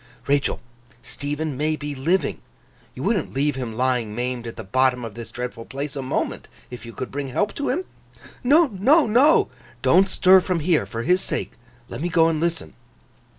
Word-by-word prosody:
'Rachael, 140 0 +1 0.4
Stephen 145 +1 -4
may 155 +3 0
be 145 -1 -5
living. 150 +4 0 0.5
You - - -6
wouldn't - - 0
leave 145 +1 +1
him 125 -4 -4
lying 125 -3 0
maimed 120 0 -3
at 115 - -7
the 110 - -7
bottom 125 +4 +1
of 110 - -7
this 115 +1 -8
dreadful 125 -2 -6
place, 140 +2 -5
a 140 - -3
moment, 130 - -3 0.2
if 120 -1 -9
you - - -7
could 130 - -6
bring 140 0 -4
help 205 +11 -1
to 285 - -3
him?' 350 +8 -1 0.6
'No, 300 +7 +6
no, 260 - +4
no!' 255 +8 +4 0.3
'Don't 195 +1 +5
stir 185 0 +6
from 180 -2 -1
here, 165 0 +1
for 115 0 -4
his 180 +5 +3
sake! - - -2 0.4
Let - - -7
me 175 - -1
go 165 -1 +4
and 160 -2 -1
listen. 165 - -2
145 Hz, 190 wpm, -23 LUFS, 125-180 Hz, 0.6 s, No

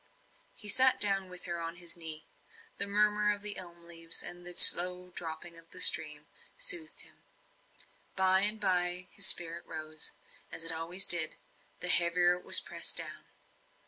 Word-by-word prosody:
He 210 - -9
sat 260 +5 +1
down 195 -2 +2
with 180 0 -8
her 170 -1 -8
on 165 +1 -9
his 175 -1 -9
knee; 160 -2 -4 0.5
the 200 - 0
murmur 210 +1 -1
of 205 0 -9
the 210 -1 -1
elm 175 -2 -10
leaves, 165 -1 -4
and 175 0 -7
the 175 0 -8
slow 180 +1 +7
dropping 165 0 -9
of 165 0 -21
the - - -11
stream, - - +2 0.3
soothed 350 -11 -1
him. - - -16 0.9
By 190 0 0
and 210 +2 +3
by, 180 -1 -3
his 200 -2 -2
spirit 170 -1 -1
rose, 155 -1 -7 0.4
as 165 - -5
it 165 - -3
always 165 +4 -2
did, 170 -3 +5 0.5
the 180 - -1
heavier 175 0 +2
it 180 0 -10
was - - +9
pressed - - -3
down. - - -2
180 Hz, 170 wpm, -27 LUFS, 170-195 Hz, 0.9 s, was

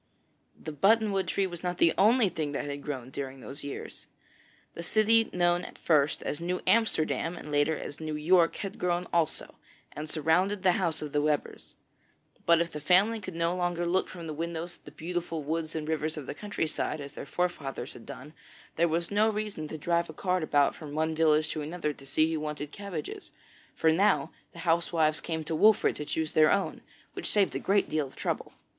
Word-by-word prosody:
The 155 - -6
button 210 +8 +3
wood 195 -1 0
tree 195 - +1
was 175 -2 -6
not 180 -1 -2
the 165 - +4
only 220 +3 +5
thing 155 -5 -3
that 140 - -2
had 145 0 -5
grown 130 -3 -5
during 135 -1 -5
those 140 +3 -7
years. 140 - -7 0.7
The - - -6
city 220 +5 +3
known 175 0 +2
at - - -9
first 150 -2 +2
as 150 - -3
'New 180 +1 -1
Amsterdam,' 175 -6 +1
and 150 - -8
later 145 +2 +2
as 145 - -7
'New 155 -1 -3
York,' 165 +2 +4
had 195 -1 -6
grown 180 0 0
also, 170 -3 0 0.4
and 150 +1 -6
surrounded 180 +6 +1
the 185 - +6
house 170 -4 0
of 150 - -5
the 145 - +1
Webbers. 150 -1 -2 0.7
But 170 -1 +6
if 170 0 -2
the 150 - -5
family 195 +8 +3
could 185 -3 -7
no 170 +1 0
longer 175 -1 -1
look 180 +2 +1
from 170 -2 -8
the 155 - -4
windows 170 +2 -4
at - - -36
the - - -10
beautiful 170 -2 -4
woods 160 +2 -3
and 155 -1 -3
rivers 155 0 -1
of 150 - -5
the - - -5
countryside, 160 -4 -2
as 140 -1 -8
their - - -8
forefathers 165 -5 -3
had 115 - -13
done, 150 +4 -9 0.4
there 170 +1 +4
was 170 +2 -1
no 210 +2 +4
reason 210 -7 -3
to 155 - -6
drive 170 +2 0
a - - -7
cart 185 +2 0
about 145 -2 +3
from 150 -2 -9
one 160 +1 +1
village 155 -1 +3
to 155 - -3
another 150 0 -3
to 135 -1 -15
see 155 +4 +2
who 160 - -1
wanted 150 -1 -4
cabbages, 195 -6 -6 0.5
for 160 - +3
now 160 -5 +3 0.2
the - - -16
housewives 165 -2 +2
came 160 -1 -3
to 160 - -4
Wolfert 215 +6 +5
to 150 - -4
choose 160 +1 -2
their 155 0 +5
own, 200 -1 0 0.3
which - - -5
saved 205 -2 +2
a - - 0
great 200 +1 +2
deal 155 -2 -1
of - - -17
trouble. - - -3
165 Hz, 210 wpm, -29 LUFS, 150-180 Hz, 0.7 s, the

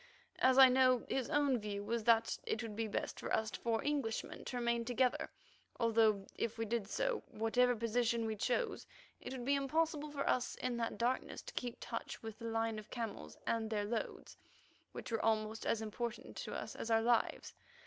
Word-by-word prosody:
As 260 0 +5
I 265 -1 +11
know, 255 -1 +4
his 265 -3 0
own 285 -5 +3
view 205 -1 -4
was 225 +1 -2
that 230 -1 +4
it 230 - -1
would 220 -2 -5
be 225 +1 -1
best 210 - -3
for - - -5
us 220 -1 +1
four 225 -1 -1
Englishmen 280 -7 -2
to 250 - -3
remain 235 -1 +1
together, 250 +1 +1 0.5
although, 220 -3 +3
if 230 - -2
we 225 - -1
did 225 -2 -1
so, - - 0
whatever 245 +3 +2
position 230 0 +1
we 220 -1 -1
chose, 400 - -1 0.3
it - - -7
would 255 -2 -5
be 280 - +3
impossible 300 +2 +1
for 285 -1 -3
us 250 - +1
in 250 -1 -2
that 230 -1 -2
darkness 245 +2 -1
to - - -9
keep 245 -2 -3
touch 230 - -5
with 220 -1 -7
the 230 - -7
line 225 -1 0
of 215 - -12
camels 230 -3 -5
and 225 -1 0
their 210 -2 0
loads, 220 +1 -4 0.5
which - - -7
were 225 - 0
almost 220 0 0
as 225 -1 +1
important 235 +2 -4
to - - -5
us - - -5
as 230 - -5
our 225 0 +4
lives. 235 0 +1
230 Hz, 195 wpm, -36 LUFS, 225-255 Hz, 0.5 s, I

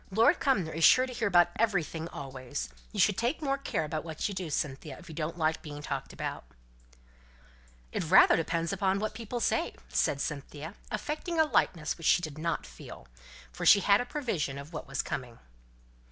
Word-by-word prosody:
Lord 230 - +4
Cumnor 195 - +1
is 165 +1 -2
sure 255 +8 +7
to 255 - -7
hear 230 -2 0
about 175 -2 +5
everything 170 -7 0
always. 130 - -6 0.2
You - - -5
should 205 -2 +4
take 240 +6 0
more 275 -3 -1
care 160 - -2
about 155 0 -3
what 160 -2 -3
you 205 - -4
do, 185 -3 -4
Cynthia, 140 -1 -3
if 175 - -14
you 165 - -9
don't 155 +2 -3
like 160 -1 0
being 145 -2 -8
talked - - -4
about." - - -5 1.5
"It - - -2
rather 190 - +8
depends 165 +2 -1
upon 195 0 +1
what 215 +1 -2
people 230 +2 -5
say," - - 0
said 140 - +1
Cynthia, 150 +3 -5 0.2
affecting 320 +3 -3
a 315 - +6
lightness 165 - 0
which 165 - -2
she 175 - +4
did 155 -2 -5
not 165 - -2
feel; 60 0 -11 0.4
for - - -7
she 200 - +7
had 200 +3 +4
a - - -3
prevision 205 - -2
of 140 +4 -9
what 155 - -6
was 135 0 -2
coming. 125 -3 -5
170 Hz, 195 wpm, -30 LUFS, 150-215 Hz, 1.5 s, rather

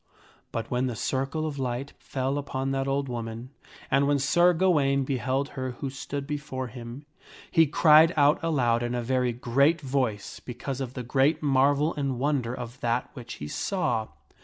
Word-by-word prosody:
[But 115 -1 -4
when 125 +1 +1
the 120 - -3
circle 135 +7 -2
of 145 -3 -4
light 130 +2 -3
fell 135 +1 -2
upon 135 -1 -3
that 135 0 -1
old 135 0 0
woman, 115 0 -5 0.4
and 140 +1 +3
when 145 0 +3
Sir 175 +6 +4
Gawaine 150 -6 +2
beheld 135 +1 -1
her 130 -2 -4
who 135 +2 -5
stood 140 +1 -5
before 140 -3 -4
him, 120 +4 -9 0.5
he 165 -1 +5
cried 155 +2 +6
out 145 +2 +4
aloud 125 -8 +2
in 120 0 -2
a 120 - -2
very 125 0 +1
great 140 +7 +2
voice 130 -7 -2
because 130 +2 -5
of 130 -1 -5
the 125 - -4
great 140 +6 +2
marvel 145 +3 +3
and 140 -4 -2
wonder 135 -3 0
of 125 0 -7
that 120 +1 -1
which 120 -1 -8
he 75 - -7
saw. 120 - -1
135 Hz, 175 wpm, -27 LUFS, 125-145 Hz, 0.5 s, cried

